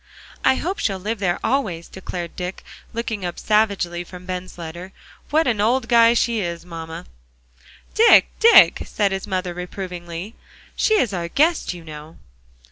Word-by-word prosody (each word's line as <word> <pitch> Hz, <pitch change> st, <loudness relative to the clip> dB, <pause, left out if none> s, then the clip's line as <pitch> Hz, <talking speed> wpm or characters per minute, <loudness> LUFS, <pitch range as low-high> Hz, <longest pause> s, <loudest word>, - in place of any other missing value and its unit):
"I -, -, +4 dB
hope 370 Hz, +8 st, -3 dB
she'll 195 Hz, -3 st, 0 dB
live 210 Hz, +3 st, -4 dB
there 180 Hz, -3 st, 0 dB
always," 190 Hz, -12 st, -1 dB
declared 175 Hz, -2 st, -7 dB
Dick, 180 Hz, +1 st, -6 dB, 0.3 s
looking 225 Hz, -3 st, -4 dB
up 175 Hz, -1 st, -4 dB
savagely 200 Hz, -5 st, +1 dB
from 180 Hz, +1 st, -12 dB
Ben's 185 Hz, 0 st, -6 dB
letter. 175 Hz, +3 st, -8 dB, 0.4 s
"What 315 Hz, +2 st, +2 dB
an 220 Hz, -4 st, +1 dB
old 240 Hz, +3 st, +1 dB
guy 235 Hz, -1 st, +5 dB
she 235 Hz, -1 st, +1 dB
is, 170 Hz, -3 st, -4 dB
mamma!" 165 Hz, -1 st, -8 dB, 0.9 s
"Dick, 455 Hz, +1 st, +6 dB
Dick," 460 Hz, +1 st, +7 dB
said 205 Hz, -2 st, -1 dB
his 195 Hz, 0 st, -4 dB
mother 185 Hz, -2 st, -2 dB
reprovingly, 180 Hz, +1 st, -7 dB, 0.4 s
"she 435 Hz, -, +2 dB
is 240 Hz, -, +1 dB
our 170 Hz, -2 st, -3 dB
guest, 305 Hz, -, +1 dB
you 170 Hz, -, -11 dB
know." 155 Hz, 0 st, -11 dB
190 Hz, 155 wpm, -21 LUFS, 175-230 Hz, 0.9 s, Dick